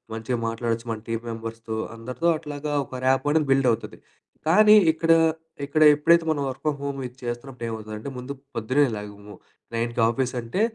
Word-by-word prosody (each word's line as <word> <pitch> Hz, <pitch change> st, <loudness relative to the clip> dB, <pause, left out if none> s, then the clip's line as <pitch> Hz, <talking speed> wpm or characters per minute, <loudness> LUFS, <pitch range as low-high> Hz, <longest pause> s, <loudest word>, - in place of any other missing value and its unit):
మంచిగా 115 Hz, +2 st, -2 dB
మాట్లాడొచ్చు 115 Hz, +1 st, -2 dB
మన 110 Hz, -1 st, -4 dB
టీమ్ 115 Hz, 0 st, -2 dB
మెంబర్స్‌తో 115 Hz, 0 st, -6 dB, 0.2 s
అందరితో 125 Hz, +9 st, -2 dB
అట్లాగా 150 Hz, 0 st, -5 dB
ఒక 130 Hz, 0 st, -8 dB
ర్యాపొ 135 Hz, +2 st, +2 dB
అనేది 155 Hz, -3 st, +1 dB
బిల్డవుతది. 125 Hz, -4 st, 0 dB, 0.5 s
కానీ 210 Hz, +5 st, +7 dB, 0.2 s
ఇక్కడ 165 Hz, +1 st, +1 dB, 0.5 s
ఇక్కడ 150 Hz, +2 st, 0 dB
ఎప్పుడైతే 170 Hz, +3 st, +4 dB
మనం 150 Hz, -3 st, 0 dB
వర్క్ 135 Hz, 0 st, -6 dB
ఫ్రామ్ 150 Hz, -2 st, 0 dB
హోమ్ 140 Hz, -1 st, -3 dB
ఇది 125 Hz, +1 st, -18 dB
చేస్తున్నప్పుడు 120 Hz, +1 st, -5 dB
ఏమవుతుందంటే 110 Hz, +2 st, -6 dB
ముందు 125 Hz, +2 st, -6 dB, 0.2 s
పొద్దున్నేలెగము 110 Hz, -4 st, -1 dB, 0.4 s
9కి 115 Hz, +1 st, -2 dB
ఆఫీసు 125 Hz, +3 st, 0 dB
అంటే 120 Hz, -, -2 dB
125 Hz, 150 wpm, -24 LUFS, 115-145 Hz, 0.5 s, కానీ